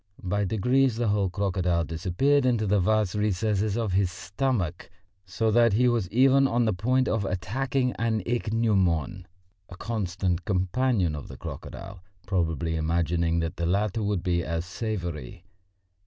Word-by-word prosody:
By 100 +2 0
degrees 125 +5 +2
the 115 -1 0
whole 100 -2 +1
crocodile 90 -2 0
disappeared 95 - +1
into 120 -4 +1
the 105 0 +2
vast 105 0 +1
recesses 105 0 0
of 115 -4 -1
his 95 -1 +2
stomach, 95 -2 -2 0.4
so 110 +4 0
that 115 -1 +4
he 125 +4 +3
was 115 -7 0
even 135 +4 +4
on 120 -1 +1
the 110 - +1
point 125 +8 +1
of 110 -2 0
attacking 125 +8 -1
an 110 -3 0
ichneumon, 100 - 0 0.4
a 90 - -10
constant 95 -5 -2
companion 95 -1 0
of 75 - -7
the - - -10
crocodile, 95 -2 -8 0.2
probably 80 -4 -1
imagining 85 +1 0
that 80 0 -4
the 85 -1 -1
latter 100 +4 0
would 100 -4 -1
be 85 -2 0
as 85 +2 -3
savoury. 90 - -5
100 Hz, 150 wpm, -26 LUFS, 90-115 Hz, 0.4 s, that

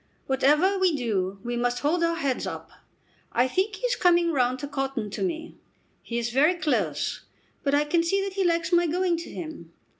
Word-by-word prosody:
"Whatever 300 +9 +3
we 370 -4 +3
do 200 -7 -1
we 240 0 -3
must 245 0 0
hold 335 +4 +1
our 335 0 +2
heads 280 -6 -1
up. - - -7 0.6
I 245 +2 +2
think 385 +9 0
he 390 - -4
is - - +1
coming 345 -4 +3
round 255 -3 +1
to 285 - -4
cotton 270 -6 -3
to - - -5
me. 330 -3 -3 0.4
He 235 - -5
is 235 0 -1
very 300 +8 +4
close, 225 - -1 0.4
but 280 0 +1
I 290 - +3
can 330 +3 +2
see 390 +4 +1
that 395 -1 -4
he 390 0 0
likes 335 -1 +1
my 345 0 +4
going 355 +2 +1
to 335 - -7
him. 310 - -8
300 Hz, 205 wpm, -26 LUFS, 245-345 Hz, 0.6 s, very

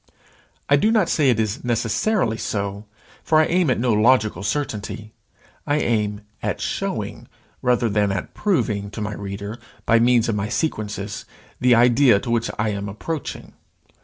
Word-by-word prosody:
I 145 - +5
do 215 - +3
not 215 -6 +3
say 145 -4 +3
it 120 -3 +2
is 110 +2 -1
necessarily 120 - 0
so; 100 0 -3 0.4
for 155 - +3
I 155 - +5
aim 175 -2 +2
at 130 - +1
no 120 -1 +2
logical 110 0 +3
certainty. 110 -2 -3 0.5
I 145 - +2
aim 105 -6 0 0.2
at - - -2
showing, - - -3 0.3
rather 125 -1 +2
than 105 -1 +1
at 95 -1 -4
proving, 105 - 0
to - - -3
my 105 0 -3
reader, 100 +3 -6 0.3
by 115 - +4
means 120 -1 +4
of 115 - 0
my 105 0 -2
sequences, 105 -7 -3 0.3
the 125 -1 +5
idea 120 -1 +5
to 120 - -4
which 115 -1 +1
I 110 +1 0
am 100 -1 -3
approaching. 150 +10 -6
115 Hz, 160 wpm, -22 LUFS, 105-130 Hz, 0.5 s, I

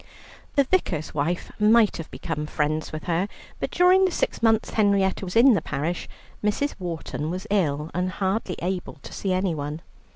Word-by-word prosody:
The 280 - +5
Vicar's 225 - 0
wife 160 +5 -1
might 215 +1 +5
have 165 - -7
become 150 -3 -4
friends 155 +1 -1
with 155 0 -6
her, 175 +2 0 0.3
but - - -2
during 365 +2 +5
the - - +2
six - - -1
months 225 -1 +3
Henrietta 200 -3 +2
was 180 -1 -5
in 245 +3 +7
the 205 - +2
parish 155 +5 -3 0.3
Mrs. 210 +8 0
Wharton 165 -3 -4
was 185 +4 -4
ill 155 -6 +1
and 180 +1 0
hardly 190 0 -1
able 180 0 -3
to - - -12
see 195 - -2
anyone. 165 -4 -1
185 Hz, 170 wpm, -25 LUFS, 155-210 Hz, 0.3 s, in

